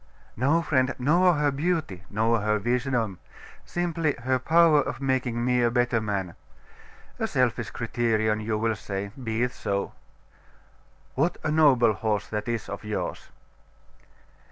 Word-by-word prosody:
'No, 145 +8 +2
friend; 130 -4 +1
nor 170 +7 +3
her 145 -1 +1
beauty, 145 - -2
nor 110 +1 +1
her 105 +1 +1
wisdom; 120 -3 -1 0.5
simply 165 -3 -1
her 130 0 +1
power 160 +2 +5
of - - -4
making 130 -3 -1
me 125 0 +2
a 120 - +3
better 120 -1 +1
man. 100 -5 -3 0.9
A - - 0
selfish 120 -3 0
criterion, 110 -2 0
you 110 0 -2
will 110 0 0
say. 100 -1 -5
Be 115 0 -1
it 125 - 0
so.... 100 -4 -3 1.2
What 165 +6 0
a 155 - 0
noble 135 -8 +5
horse 105 -1 -1
that 105 +1 -3
is 115 -3 -2
of 100 - -6
yours! 105 0 -4
120 Hz, 140 wpm, -26 LUFS, 110-140 Hz, 1.2 s, power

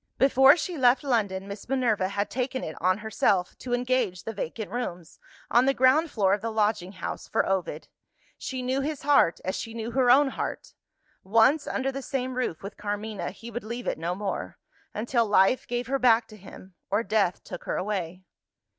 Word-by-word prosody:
Before 270 +3 +6
she 340 -1 -4
left 250 +2 +4
London, 200 -8 0
Miss 200 0 -9
Minerva 235 -8 +1
had 200 +1 -2
taken 260 +1 -2
it 160 - -5
on 185 +2 +3
herself 195 -4 +1
to 250 - -7
engage 245 -7 -1
the 225 - -5
vacant 205 +1 -5
rooms, 180 -8 -5 0.3
on 245 +3 +4
the 275 - +3
ground 270 +6 +4
floor 195 -7 +2
of 205 - 0
the 230 - -2
lodging 210 -4 0
house, 180 - -6
for - - +1
Ovid. 190 -2 -2 0.5
She 260 -1 -5
knew 260 +2 0
his 295 0 -4
heart, 280 -12 +4
as 185 - -1
she 225 0 -6
knew 230 +1 -4
her 255 0 +2
own 270 +3 +6
heart. - - -5 0.5
Once 230 +9 +3
under 270 0 -1
the 275 +1 -5
same 260 -1 -3
roof 250 -11 -2
with 200 +2 -8
Carmina, 205 0 -4
he 235 +1 -10
would 240 +2 -5
leave 235 +3 -6
it - - -2
no 170 +2 -2
more 200 0 -4 0.3
until 235 +2 0
life 205 +4 +3
gave 245 +1 -2
her 270 +3 -1
back 235 -2 +4
to 215 - -12
him, 190 -1 -13 0.2
or 205 +3 +1
death 205 -5 0
took 180 - -9
her - - -2
away. 185 -3 -3
225 Hz, 195 wpm, -26 LUFS, 195-255 Hz, 0.5 s, Before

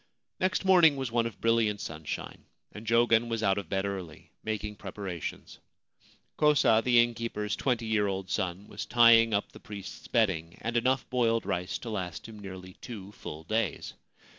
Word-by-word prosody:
Next 185 +1 0
morning 175 -6 +6
was 135 -3 -3
one 115 -1 +1
of 115 - -10
brilliant 115 -2 +2
sunshine, 80 -1 -6 0.3
and 105 +2 -10
Jogen 115 0 +4
was 115 -1 -2
out 100 0 +2
of 95 - -9
bed 95 0 0
early, 95 -6 -6
making 105 -1 -4
preparations. 95 -4 -6 0.8
Kosa, 145 -7 +4
the 120 -2 +6
innkeeper's 115 -3 -3
twenty 120 -4 0
year 110 -2 +1
old 95 -1 -3
son, 95 +2 -2
was - - -6
tying 115 -1 +6
up 100 -1 0
the - - -13
priest's 100 -2 -9
bedding 95 -8 0
and 115 +1 -3
enough 130 +3 +1
boiled 115 -2 +2
rice 90 +2 -2
to 115 - -7
last 90 -6 -4
him 110 -2 -11
nearly 95 -2 -9
two 105 -5 -8
full 80 -6 -8
days. 110 -2 -2
110 Hz, 165 wpm, -29 LUFS, 95-115 Hz, 0.8 s, morning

